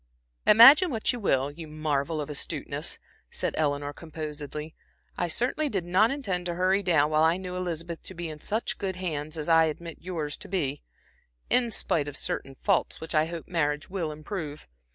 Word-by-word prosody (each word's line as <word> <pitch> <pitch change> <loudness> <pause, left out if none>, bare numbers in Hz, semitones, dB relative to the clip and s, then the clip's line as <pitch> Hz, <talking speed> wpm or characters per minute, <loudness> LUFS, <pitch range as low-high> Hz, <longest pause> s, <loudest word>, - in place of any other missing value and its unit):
"Imagine 275 - +9
what 225 -2 0
you 245 - -4
will, 140 - +1
you 160 +2 -9
marvel 155 0 -1
of 145 - -3
astuteness," 150 -2 -2 0.3
said - - -2
Eleanor, 145 -1 0
composedly. 150 -1 -6 0.4
"I 175 - -1
certainly 250 - +1
did 195 -7 -2
not 185 +6 +4
intend 195 -11 -2
to 175 - -2
hurry 185 +3 +2
down 160 -5 +3
while 155 0 +3
I 165 +2 +4
knew 180 -1 -6
Elizabeth 170 -2 -4
to 190 - -7
be 175 0 -4
in 155 -1 -7
such 220 +8 -2
good 190 -3 -2
hands, 155 -4 -4
as 150 - -4
I 165 -1 +6
admit 165 +1 -5
yours 160 -5 -3
to - - -9
be, 145 -7 -1 0.7
in 245 -1 +3
spite 160 -8 0
of 145 - -4
certain 135 - -2
faults 195 +6 0
which 160 - -6
I 155 0 +4
hope 170 -1 -7
marriage 150 -2 -1
will 175 -5 -2
improve. 155 - -6
165 Hz, 185 wpm, -27 LUFS, 150-185 Hz, 0.7 s, Imagine